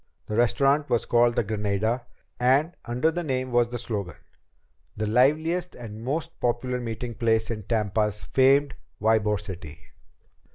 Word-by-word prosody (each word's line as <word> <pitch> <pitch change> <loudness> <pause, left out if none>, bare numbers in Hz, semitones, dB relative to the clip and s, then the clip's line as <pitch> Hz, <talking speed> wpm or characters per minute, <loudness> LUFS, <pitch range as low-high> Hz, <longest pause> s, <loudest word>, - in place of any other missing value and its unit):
The 105 - -4
restaurant 140 +5 +2
was 120 - +1
called 120 0 +3
the - - +2
Granada, 110 +3 -1 0.3
and 135 +7 +3
under 125 +7 +1
the 175 +2 -3
name 130 -4 -2
was 120 -1 +3
the 120 - -4
slogan: 105 - -4 0.8
"The 110 - -1
liveliest 155 +10 +2
and 110 -2 -9
most 160 +6 -3
popular 125 +1 -1
meeting 120 +1 -4
place 115 0 +1
in 110 -2 -4
Tampa's 105 -1 0
famed 135 +1 +3 0.3
Ybor 105 -2 +2
City." 85 -7 -8
120 Hz, 140 wpm, -26 LUFS, 110-130 Hz, 0.8 s, called